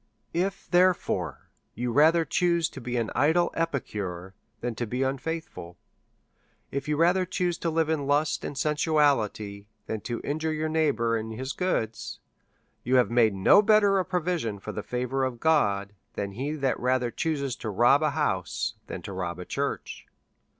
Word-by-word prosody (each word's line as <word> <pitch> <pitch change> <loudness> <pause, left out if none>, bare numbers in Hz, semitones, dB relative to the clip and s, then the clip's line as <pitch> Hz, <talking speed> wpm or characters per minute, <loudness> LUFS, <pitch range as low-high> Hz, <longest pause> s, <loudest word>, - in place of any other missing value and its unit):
If, 190 +3 -2
therefore, 175 - +1 0.2
you 120 +2 -2
rather 160 +6 +5
choose 170 -2 +1
to 135 - -10
be 120 +1 -3
an 115 -2 -1
idle 160 +5 +3
epicure 100 - -3 0.3
than 120 0 -3
to 120 +1 -4
be 125 +4 -1
unfaithful; 135 - -4 0.9
if 140 +1 -3
you 150 -1 0
rather 175 +3 +4
choose 180 -1 -1
to 170 - -1
live 160 -1 +1
in 155 -3 -1
Just 145 +2 +1
and 140 - -5
sensuality 140 -10 +1 0.2
than 110 -1 -4
to 120 +1 -4
injure 155 +2 -1
your 155 0 -1
neighbour 145 -8 +1
in 110 0 -3
his 130 +5 -4
goods, 115 - -2 0.6
you 130 +2 +1
have 125 -2 +4
made 115 -4 +4
no 95 - +6
better 205 -2 +4
a - - +1
provision 175 - -1
for 95 - -7
the 105 - -4
favour 125 +4 -2
of 130 -2 -2
God 105 -11 +2 0.2
than 100 -1 -3
he 135 +9 -3
that 135 -4 -1
rather 125 -1 +1
chooses 140 -4 -2
to 110 - -5
rob 120 +8 +4
a 155 - +2
house 110 - -1
than - - -6
to 100 - -6
rob 90 -2 -3
a 90 - -7
church. - - -4
135 Hz, 170 wpm, -27 LUFS, 110-160 Hz, 0.9 s, no